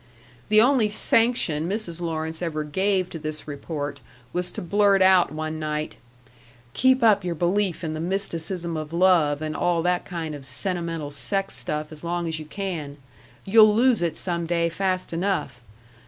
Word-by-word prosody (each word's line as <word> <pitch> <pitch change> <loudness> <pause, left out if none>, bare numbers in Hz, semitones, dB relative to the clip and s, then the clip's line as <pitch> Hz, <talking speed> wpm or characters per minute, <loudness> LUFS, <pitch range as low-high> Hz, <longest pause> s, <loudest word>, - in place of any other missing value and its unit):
The 215 0 +6
only 240 -2 +4
sanction 210 -7 +1
Mrs. 190 -5 -3
Lawrence 160 -1 -3
ever 155 -3 -2
gave 190 +4 0
to 165 - -6
this 155 0 -5
report 145 -1 -5 0.3
was 180 0 -1
to - - -5
blurt 200 +2 +3
out 185 -1 +5
one 155 +1 -4
night: 155 0 -3 0.8
"Keep 260 -1 +3
up 210 -3 +5
your 175 -1 -2
belief 180 +2 0
in 155 -1 -2
the 155 - -4
mysticism 170 -1 -2
of 155 0 -5
love 170 -5 +3
and 155 0 -3
all 175 -2 +1
that 180 0 +1
kind 165 -4 -5
of 145 -2 -8
sentimental 165 +2 -3
sex 195 +7 -2
stuff 150 +5 -4
as 155 0 -11
long 170 0 -2
as 160 -1 -2
you 155 - -8
can. 155 -5 -5 0.5
You'll 215 +1 +6
lose 240 -2 +3
it 165 -2 -1
some 170 -2 -2
day 170 0 +1
fast 185 +1 -2
enough. 165 -8 -2
170 Hz, 170 wpm, -24 LUFS, 155-195 Hz, 0.8 s, The